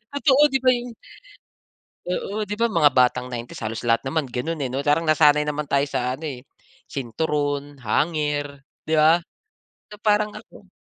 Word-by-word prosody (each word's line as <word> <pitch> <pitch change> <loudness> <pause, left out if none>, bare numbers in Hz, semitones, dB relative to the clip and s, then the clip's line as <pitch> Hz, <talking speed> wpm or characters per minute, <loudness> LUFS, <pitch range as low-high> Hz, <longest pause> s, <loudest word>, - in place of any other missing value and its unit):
Totoo 285 -1 +4
di 270 - +3
ba 255 - +5
yung 245 0 -4 1.1
Oo, 195 +4 -3
'di 210 - -3
ba 230 - +2
mga 165 -10 +4
Batang 125 0 +3
90's 120 -1 -7
halos 115 +2 -4
lahat 115 0 +2
naman 140 +3 -1
ganun, 130 +6 -4
eh 135 -4 -3
'no. 135 - -1
Parang 150 +3 +1
nasanay 150 -1 +4
naman 150 0 -3
tayo 140 0 +2
sa 125 -2 -2
ano 160 - -8 0.6
sinturon, 145 +2 -2
hanger, 145 +2 -1 0.2
di 155 0 -1
ba? 160 +3 +5 0.7
So 210 - -11
parang 210 0 +2
ako 200 -3 -18
150 Hz, 160 wpm, -23 LUFS, 135-175 Hz, 1.1 s, ba